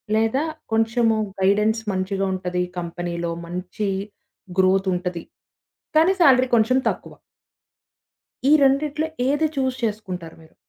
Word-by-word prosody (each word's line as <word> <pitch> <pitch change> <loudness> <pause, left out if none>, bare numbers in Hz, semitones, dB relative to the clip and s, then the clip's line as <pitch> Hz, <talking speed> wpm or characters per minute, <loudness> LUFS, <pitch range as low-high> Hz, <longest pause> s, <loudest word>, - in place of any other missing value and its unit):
లేదా, 225 +6 +1 0.3
కొంచము 225 0 +2 0.2
గైడెన్స్ 210 +3 +2
మంచిగా 190 +1 -1
ఉంటది, 180 -1 -2 0.2
కంపెనీ‌లో 170 0 -4 0.2
మంచి 180 +4 -4 0.7
గ్రోత్ 190 +1 +3
ఉంటది. 180 -1 -4 0.7
కానీ, 330 +5 +5
సాలరీ 260 -5 +6
కొంచెం 235 +3 +3
తక్కువ. - - -6 1.4
ఈ - - +6
రెండిట్లో 290 +3 +2 0.2
ఏది 295 +3 +2
చూస్ 260 -1 0
చేసుకుంటారు 190 -7 -4
మీరు? 160 - -20
210 Hz, 105 wpm, -22 LUFS, 180-255 Hz, 1.4 s, సాలరీ